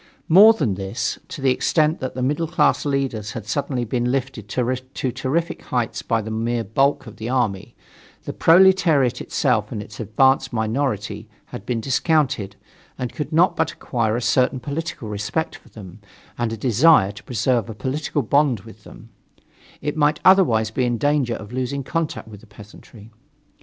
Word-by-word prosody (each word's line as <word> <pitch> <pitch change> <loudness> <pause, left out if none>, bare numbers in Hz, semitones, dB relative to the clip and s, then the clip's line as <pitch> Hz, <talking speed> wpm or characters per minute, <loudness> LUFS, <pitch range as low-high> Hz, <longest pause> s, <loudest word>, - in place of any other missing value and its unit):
More 205 +7 +8
than 140 - -1
this: 95 +3 -3
To 170 -7 -8
the 135 - +4
extent 155 +4 +1
that 130 -2 -5
the 130 - -2
middle 150 +5 0
class 150 -2 +1
leaders 135 -7 -2
had 110 -4 -7
suddenly 130 +1 -2
been 120 +2 -1
lifted 120 -5 -3
to 130 +2 -2
terrific 165 +8 -2
heights 120 -2 -2
by 115 -1 -1
the 110 - -6
mere 115 +1 -1
bulk 135 +7 +1
of 110 -1 -12
the 115 +1 -5
army, 115 -7 -1 0.5
the - - -5
proletariat 170 -7 +4
itself, - - 0
and - - -4
its 105 0 -10
advanced 130 +5 +2
minority, 110 -3 -2 0.2
had 105 - -10
been 120 -2 -1
discounted, 135 - 0 0.4
and 125 -2 -4
could 150 - -5
not 170 +3 +3
but - - 0
acquire 115 -3 -1
a 120 - -2
certain 130 +2 +2
political 150 -2 -5
respect 105 +10 -3
for - - -22
them 95 -3 -12 0.4
and 120 -2 -2
a 115 - -4
desire 120 -2 +4
to 105 +1 -13
preserve 120 -1 0
a 110 - -7
political 140 +5 -2
bond 135 -2 +2
with - - -15
them; - - -14 0.7
it 150 - -3
might 150 +1 +2
otherwise 120 - +4
be 125 - -1
in 120 -1 0
danger 145 -3 +1
of 105 0 -10
losing 130 +2 -3
contact 160 -5 -3
with 105 -2 -11
the 115 - -18
peasantry. 105 +1 -15
125 Hz, 175 wpm, -21 LUFS, 110-145 Hz, 0.7 s, More